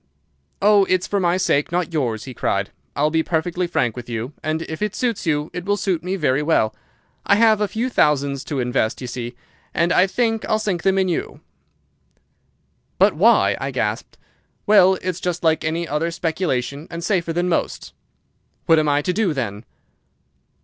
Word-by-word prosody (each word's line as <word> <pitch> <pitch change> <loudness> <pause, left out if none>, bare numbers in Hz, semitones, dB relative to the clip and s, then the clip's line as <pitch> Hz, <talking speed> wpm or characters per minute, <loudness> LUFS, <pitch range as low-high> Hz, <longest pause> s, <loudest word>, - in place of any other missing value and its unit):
"'Oh, 205 -1 +5
it's 185 -1 +1
for 200 - -1
my 175 -1 +2
sake, 145 -5 +1
not 175 0 +1
for - - -20
yours,' 120 -9 -1
he 130 - -8
cried. - - -1 0.2
'I'll 150 +2 +1
be 160 0 +2
perfectly 175 +2 -1
frank 125 -9 0
with 120 -1 -8
you, 115 +4 -4
and 155 +1 -2
if 160 +2 -7
it 210 -1 -1
suits 235 -8 -2
you 150 -1 0
it 175 0 -5
will 205 +2 0
suit 185 -5 -1
me 185 +2 -2
very 145 -6 +1
well. 150 -8 +1 0.5
I 200 - +4
have 220 -1 +4
a 210 - +2
few 225 +5 -2
thousands 140 - +1
to 145 -4 -3
invest, 125 -2 0
d'ye 130 - -7
see, 120 0 -6 0.4
and 170 +1 +2
I 185 - +4
think 225 +2 0
I'll 215 - +3
sink 200 -5 -2
them 195 +1 +2
in 190 -1 +2
you.' 175 - -3 1.6
"'But - - +4
why?' - - +4
I - - -2
gasped. - - -3 0.5
"'Well, 190 -2 +6
it's 185 -1 -2
just 175 -1 -3
like 160 -1 +2
any 165 +2 -2
other 155 +3 -1
speculation, 160 -5 -2
and 170 0 -6
safer 170 -3 0
than 175 +2 0
most.' 175 - -2 0.7
"'What 165 -1 +5
am 155 -1 +1
I 145 0 +2
to 180 - 0
do, 190 -5 0
then? 110 -4 -4
165 Hz, 190 wpm, -21 LUFS, 145-185 Hz, 1.6 s, Well